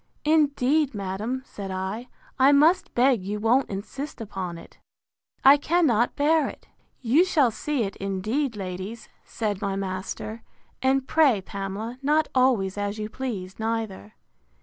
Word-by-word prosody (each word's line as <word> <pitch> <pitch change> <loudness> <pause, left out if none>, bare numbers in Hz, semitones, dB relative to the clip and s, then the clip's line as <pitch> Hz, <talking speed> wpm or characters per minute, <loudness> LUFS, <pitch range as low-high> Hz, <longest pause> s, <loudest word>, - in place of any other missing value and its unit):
Indeed, 295 -2 +2
madam, 205 +7 -3
said 200 -6 -7
I, 190 +6 -4 0.3
I 265 +2 +6
must 310 +6 +3
beg 245 -3 +4
you 205 +2 -3
won't 240 +5 +2
insist 255 +10 -6
upon 190 -5 -5
it. - - -15 0.7
I 275 +2 +9
cannot 290 -7 +2
bear 300 +1 +3
it.—You 260 +8 -1
shall 300 -10 +3
see 260 +4 -2
it, 195 -1 -5
indeed, 215 +7 -2
ladies, 190 +3 -6
said 210 -3 -3
my 200 -2 -1
master; 195 +3 -5 0.4
and 265 0 +2
pray, 290 -9 +4
Pamela, 200 +5 -6
not 300 +2 +2
always 230 -7 +2
as 205 +1 -2
you 215 0 -4
please, 210 -7 -5
neither. 220 - -3
225 Hz, 135 wpm, -25 LUFS, 195-275 Hz, 0.7 s, I